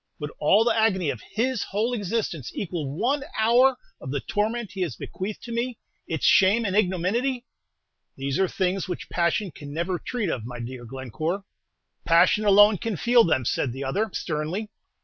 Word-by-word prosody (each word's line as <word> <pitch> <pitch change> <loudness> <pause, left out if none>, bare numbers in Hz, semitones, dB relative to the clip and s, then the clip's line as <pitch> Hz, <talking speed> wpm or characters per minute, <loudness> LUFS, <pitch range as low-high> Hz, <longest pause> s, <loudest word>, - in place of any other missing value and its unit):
Would 150 -1 -5
all 200 +9 +5
the 230 -1 +2
agony 190 -8 +2
of 110 - -8
his 235 +1 -1
whole 220 +5 -1
existence 205 - -2
equal 165 -7 -3
one 270 +7 +1
hour 245 +4 +4 0.2
of 135 - -7
the 140 +1 -1
torment 215 - -2
he 195 - -6
has 165 -10 -1
bequeathed 195 - -6
to 235 - -7
me, 235 0 -2 0.3
its 160 -3 -2
shame 210 +4 +5
and 195 -1 -1
ignominy?" 215 +7 0 0.7
"These 135 +2 -2
are 190 - +3
things 190 +1 -1
which 180 - -5
passion 175 +3 0
can 145 -2 -10
never 170 +3 -2
treat 225 -9 -2
of, 120 - -3
my 120 +1 -7
dear 120 +1 -7
Glencore." 135 - -4 0.6
"Passion 170 +5 +4
alone 205 0 +6
can 225 -3 -2
feel 240 +6 +5
them," 130 - +1
said 125 +1 0
the 135 +2 -5
other, 200 +12 -1
sternly. 170 +8 -3
190 Hz, 175 wpm, -25 LUFS, 155-225 Hz, 0.7 s, alone